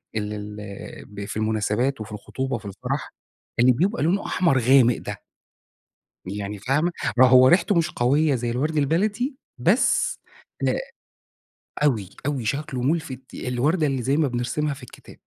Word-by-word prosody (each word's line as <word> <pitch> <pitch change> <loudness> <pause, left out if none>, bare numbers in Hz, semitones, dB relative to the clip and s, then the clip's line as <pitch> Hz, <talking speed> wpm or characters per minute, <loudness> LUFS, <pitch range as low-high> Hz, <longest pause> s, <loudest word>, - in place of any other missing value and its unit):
ال 105 0 -2
ال 105 -1 -8
ب 100 0 -8
في 105 - -6
المناسبات 110 +4 0
وفي 105 - -7
الخطوبة 130 +6 -4
وفي - - -7
الفَرَح 100 - -4 0.5
اللي 125 +1 +6
بيبقى 185 - +1
لونه 185 +5 +1
أحمر 165 -8 +2
غامق 125 0 +5
ده؟ - - -6 1.1
يعني 100 +2 -5
فاهمة؟ 145 - +1 0.3
ما 130 0 +8
هو 130 0 +7
ريحته 180 +4 +4
مش 165 -2 +2
قويّة 140 +4 +2
زي 120 -1 -2
الوَرْد 150 +6 -1
البلدي، 205 - +1 0.2
بس - - +2 0.5
آآ - - +2 1.1
أوي، 110 -10 +1 0.2
أوي 135 -5 -1
شكله 140 +1 -2
مُلفِت، 135 -3 -2
الوردة 145 +6 0
اللي 135 -2 -1
زي 135 +5 +1
ما 155 -3 +3
بنرسمها 130 +4 -1
في 135 -1 -12
الكتاب. - - -14
130 Hz, 150 wpm, -24 LUFS, 110-155 Hz, 1.1 s, ما